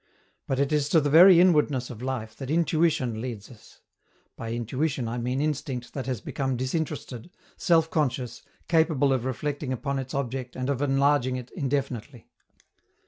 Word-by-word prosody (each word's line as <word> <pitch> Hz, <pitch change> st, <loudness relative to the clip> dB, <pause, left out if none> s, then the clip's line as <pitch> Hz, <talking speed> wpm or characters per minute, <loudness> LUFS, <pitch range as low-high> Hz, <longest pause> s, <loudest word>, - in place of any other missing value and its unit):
But 135 Hz, -, -1 dB
it 140 Hz, +1 st, +1 dB
is 150 Hz, -1 st, +1 dB
to 160 Hz, -, +5 dB
the 145 Hz, -1 st, 0 dB
very 175 Hz, +3 st, +9 dB
inwardness 150 Hz, -8 st, +3 dB
of 115 Hz, -1 st, -9 dB
life 120 Hz, -4 st, -4 dB
that 135 Hz, -2 st, -7 dB
intuition 155 Hz, -7 st, +1 dB
leads 115 Hz, -3 st, -6 dB
us 115 Hz, -, -17 dB, 0.5 s
by 115 Hz, 0 st, -6 dB
intuition 125 Hz, +3 st, -2 dB
I 120 Hz, +2 st, -3 dB
mean 125 Hz, +3 st, -1 dB
instinct 145 Hz, -4 st, -3 dB
that 135 Hz, -2 st, -5 dB
has 125 Hz, -5 st, -2 dB
become 135 Hz, -2 st, -2 dB
disinterested, 130 Hz, -1 st, -4 dB, 0.3 s
self 165 Hz, -2 st, +3 dB
conscious, 130 Hz, -5 st, -1 dB, 0.3 s
capable 160 Hz, -5 st, +3 dB
of 130 Hz, -2 st, -1 dB
reflecting 140 Hz, +1 st, -3 dB
upon 135 Hz, +2 st, -2 dB
its 130 Hz, 0 st, -6 dB
object 130 Hz, -2 st, -3 dB
and 130 Hz, +2 st, -2 dB
of 135 Hz, -1 st, -2 dB
enlarging 140 Hz, -2 st, +2 dB
it 125 Hz, -1 st, -7 dB
indefinitely. 135 Hz, -, -3 dB
135 Hz, 160 wpm, -26 LUFS, 125-150 Hz, 0.5 s, very